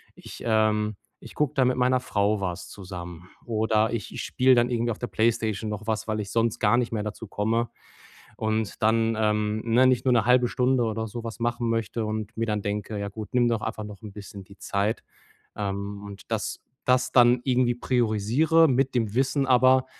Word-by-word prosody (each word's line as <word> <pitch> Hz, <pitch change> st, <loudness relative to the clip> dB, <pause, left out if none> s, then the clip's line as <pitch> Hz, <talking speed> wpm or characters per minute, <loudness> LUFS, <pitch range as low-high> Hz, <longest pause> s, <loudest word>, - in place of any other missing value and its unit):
ich, -, -, -11 dB
ähm 110 Hz, -1 st, +2 dB, 0.3 s
ich -, -, -12 dB
gucke 150 Hz, -3 st, 0 dB
dann 130 Hz, -2 st, +3 dB
mit 130 Hz, -, -1 dB
meiner 125 Hz, 0 st, +2 dB
Frau 105 Hz, -4 st, 0 dB
was 90 Hz, -2 st, -4 dB
zusammen 90 Hz, -2 st, -9 dB, 0.2 s
oder 110 Hz, -1 st, +1 dB
ich 110 Hz, -5 st, -4 dB
ich -, -, -4 dB
spiele 130 Hz, +1 st, +3 dB
dann 120 Hz, 0 st, +3 dB
irgendwie 120 Hz, -1 st, 0 dB
auf 110 Hz, -, -6 dB
der 120 Hz, -, -3 dB
PlayStation 110 Hz, 0 st, 0 dB
noch 105 Hz, 0 st, -6 dB
was, 110 Hz, -1 st, -2 dB
weil 110 Hz, -1 st, -1 dB
ich 100 Hz, -2 st, -4 dB
sonst 115 Hz, +1 st, 0 dB
gar 105 Hz, +1 st, +3 dB
nicht 120 Hz, -1 st, 0 dB
mehr 110 Hz, -2 st, -1 dB
dazu 105 Hz, +1 st, -6 dB
komme 115 Hz, +3 st, -1 dB, 0.7 s
und 110 Hz, -1 st, -2 dB
dann, 115 Hz, +1 st, +2 dB
ähm, 105 Hz, 0 st, 0 dB
ne, 120 Hz, +3 st, +4 dB
nicht 125 Hz, -1 st, +2 dB
nur 130 Hz, -, +3 dB
‘ne 115 Hz, -3 st, +3 dB
0,5 125 Hz, 0 st, +4 dB
Stunde 125 Hz, +1 st, +1 dB
oder 110 Hz, 0 st, -2 dB
so 115 Hz, +2 st, -7 dB
was 115 Hz, -1 st, -6 dB
machen 120 Hz, 0 st, -1 dB
möchte 115 Hz, 0 st, -1 dB
und 110 Hz, 0 st, -4 dB
mir 115 Hz, -, 0 dB
dann 105 Hz, -1 st, -1 dB
denke: 105 Hz, +1 st, -3 dB
„Ja 100 Hz, 0 st, -3 dB
gut, 105 Hz, +1 st, -7 dB
nimm 125 Hz, -1 st, +3 dB
doch 115 Hz, -2 st, -1 dB
einfach 110 Hz, -, -4 dB
noch 105 Hz, -1 st, -10 dB
‘n 105 Hz, -2 st, -9 dB
bisschen 100 Hz, -1 st, -10 dB
die 100 Hz, +1 st, -17 dB
Zeit.“ 100 Hz, +2 st, -1 dB, 0.5 s
Ähm, 100 Hz, 0 st, -4 dB
und 100 Hz, -1 st, -10 dB
das -, -, -2 dB, 0.2 s
das 125 Hz, 0 st, +2 dB
dann 120 Hz, -1 st, +5 dB
irgendwie 125 Hz, -2 st, +2 dB
priorisiere 125 Hz, +8 st, +2 dB
mit 135 Hz, 0 st, +1 dB
dem 110 Hz, -3 st, 0 dB
Wissen 135 Hz, +2 st, +1 dB
aber: 130 Hz, 0 st, +4 dB
110 Hz, 205 wpm, -26 LUFS, 105-125 Hz, 0.7 s, dann